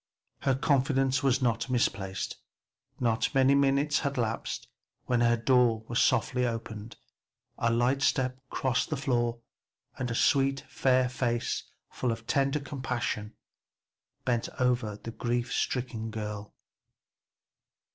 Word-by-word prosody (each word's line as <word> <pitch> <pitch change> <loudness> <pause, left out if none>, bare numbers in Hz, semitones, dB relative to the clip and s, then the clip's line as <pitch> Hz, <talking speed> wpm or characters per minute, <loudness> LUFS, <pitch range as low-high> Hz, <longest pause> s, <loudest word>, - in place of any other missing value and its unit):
Her 135 -2 +1
confidence 135 -1 +2
was 130 -1 +2
not 115 0 0
misplaced. 95 -6 -1 0.6
Not 115 +2 +1
many 135 +1 +5
minutes 140 +2 +3
had 140 -2 -2
elapsed 115 -2 -2 0.4
when 120 -1 +1
her 120 0 +4
door 120 -2 +3
was 120 +1 +1
softly 125 0 +2
opened, 115 -2 -4 0.6
a 115 - +2
light 120 +4 +2
step 130 -1 +1
crossed 130 0 0
the 155 - -1
floor 120 -3 0 0.6
and 125 -2 -1
a 115 - -2
sweet 135 +1 +3
fair 130 -1 +2
face, 120 -2 -1 0.3
full 125 - -1
of 115 0 -5
tender 140 +3 +1
compassion, 125 -6 -3 0.9
bent 120 -2 0
over 125 -4 +1
the 115 - -7
grief 120 +1 -2
stricken 120 -3 -2
girl. 105 -1 -6
125 Hz, 125 wpm, -29 LUFS, 115-135 Hz, 0.9 s, many